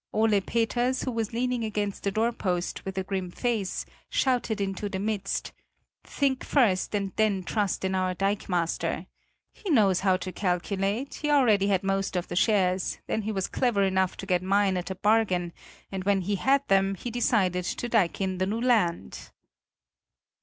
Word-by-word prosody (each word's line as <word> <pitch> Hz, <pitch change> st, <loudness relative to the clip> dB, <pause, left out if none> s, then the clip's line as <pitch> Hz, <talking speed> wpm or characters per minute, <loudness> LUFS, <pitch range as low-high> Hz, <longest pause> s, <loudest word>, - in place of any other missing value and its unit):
Ole 215 Hz, -2 st, +3 dB
Peters 240 Hz, +4 st, 0 dB
who 255 Hz, -, -2 dB
was 225 Hz, -2 st, -2 dB
leaning 245 Hz, 0 st, -1 dB
against 205 Hz, -2 st, -2 dB
the 200 Hz, -, 0 dB
doorpost 195 Hz, -4 st, -1 dB
with 190 Hz, 0 st, -5 dB
a 190 Hz, -, 0 dB
grim 190 Hz, -1 st, -3 dB
face, 220 Hz, -1 st, -2 dB, 0.2 s
shouted 245 Hz, -5 st, 0 dB
into 200 Hz, +1 st, -2 dB
the 190 Hz, -, -3 dB
midst: 200 Hz, 0 st, -2 dB, 0.5 s
"Think 270 Hz, -2 st, -1 dB
first 210 Hz, -8 st, +2 dB
and 200 Hz, -1 st, -1 dB
then 210 Hz, -4 st, +2 dB
trust 200 Hz, 0 st, -1 dB
in 190 Hz, -, 0 dB
our 185 Hz, -1 st, 0 dB
dikemaster! 190 Hz, -3 st, -1 dB, 0.5 s
He 410 Hz, -, -7 dB
knows 205 Hz, -, +4 dB
how 190 Hz, -1 st, +2 dB
to 185 Hz, 0 st, -6 dB
calculate; 195 Hz, +7 st, -2 dB
he 300 Hz, -, -1 dB
already 225 Hz, -9 st, +4 dB
had 195 Hz, -2 st, +1 dB
most 195 Hz, 0 st, -1 dB
of 180 Hz, 0 st, -2 dB
the -, -, -4 dB
shares, 185 Hz, -2 st, +2 dB
then 220 Hz, -, -1 dB
he 215 Hz, +1 st, -3 dB
was 190 Hz, -3 st, -1 dB
clever 235 Hz, -6 st, +1 dB
enough 190 Hz, -1 st, +1 dB
to -, -, -6 dB
get 180 Hz, -2 st, +1 dB
mine 195 Hz, +1 st, +2 dB
at 180 Hz, 0 st, -3 dB
a 190 Hz, -, -3 dB
bargain, 190 Hz, -4 st, +1 dB, 0.4 s
and 190 Hz, -1 st, -4 dB
when 195 Hz, 0 st, +2 dB
he 200 Hz, +3 st, -2 dB
had 270 Hz, +7 st, +2 dB
them, 195 Hz, 0 st, +3 dB
he 240 Hz, +5 st, -6 dB
decided 195 Hz, -7 st, +1 dB
to 240 Hz, -, -3 dB
dike 210 Hz, -8 st, +1 dB
in 190 Hz, -2 st, -2 dB
the 185 Hz, -, +1 dB
new 215 Hz, +3 st, -1 dB
land." 210 Hz, -, 0 dB
200 Hz, 175 wpm, -27 LUFS, 185-225 Hz, 0.5 s, knows